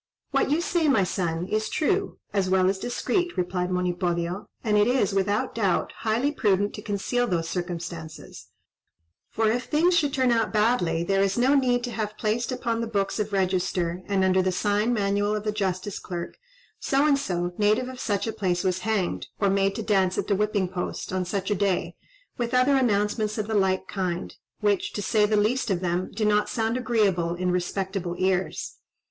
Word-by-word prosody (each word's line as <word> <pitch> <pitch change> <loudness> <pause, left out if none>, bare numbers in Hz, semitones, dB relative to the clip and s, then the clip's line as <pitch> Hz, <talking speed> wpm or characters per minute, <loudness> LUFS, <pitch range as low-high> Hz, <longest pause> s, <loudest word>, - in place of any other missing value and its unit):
"What - - +2
you 305 +4 +2
say, 345 -2 +1
my 260 -9 +4
son, 170 -2 -2
is 215 +1 -1
true, 390 +5 0 0.2
as 195 -2 +1
well 185 0 +3
as 190 0 -1
discreet," 350 - -1
replied 180 0 -1
Monipodio; 180 0 -1 0.2
"and 215 -2 +1
it 210 +1 +4
is, 245 -6 +2
without 205 +6 0
doubt, 205 -4 0
highly 230 +6 0
prudent 205 -7 +1
to 210 - -7
conceal 225 +4 -1
those 170 -5 -1
circumstances; 170 -2 -6 0.8
for 220 0 0
if 245 +1 -1
things 340 +4 +3
should 300 -4 +2
turn 260 -2 +2
out 230 -2 +1
badly, 210 -7 +2
there 195 +2 +1
is 195 +1 +1
no 255 +3 +4
need 250 -3 +2
to 245 - -3
have 215 -2 -4
placed 230 +4 -1
upon 230 -2 -1
the 230 - -2
books 200 -1 -1
of 210 0 -2
register, 185 -2 0
and 195 -2 +1
under 190 0 +3
the 185 0 +1
sign 205 +4 +1
manual 205 -1 +1
of 210 - -3
the 215 - 0
justice 195 -1 -2
clerk, 175 -1 -6 0.4
'So 275 +2 +2
and 285 -2 +4
so, 175 -8 -2
native 215 +4 +2
of 255 -1 -8
such 205 -4 -1
a 225 - -3
place, 185 -4 -1
was 185 -1 0
hanged, 195 -2 -1
or 200 -2 +2
made 195 0 +1
to 225 - -3
dance 190 -4 +2
at - - 0
the 200 - +1
whipping 205 -2 0
post, 180 0 -4
on 185 -1 0
such 195 +2 -2
a - - +3
day,' 195 -2 0 0.5
with 240 +1 -1
other 255 +3 +4
announcements 215 -3 +1
of 215 - -1
the 220 - -4
like 190 -2 +1
kind, 180 -3 -3 0.3
which, 205 -2 +1
to 205 - -3
say 210 0 +3
the 215 0 +2
least 230 +4 +1
of 190 -3 +1
them, 180 0 -1
do 215 +1 -1
not 210 0 +2
sound 225 0 -1
agreeable 200 -9 +1
in 180 +1 -1
respectable 180 0 -2
ears. 185 0 -1
205 Hz, 195 wpm, -25 LUFS, 185-230 Hz, 0.8 s, my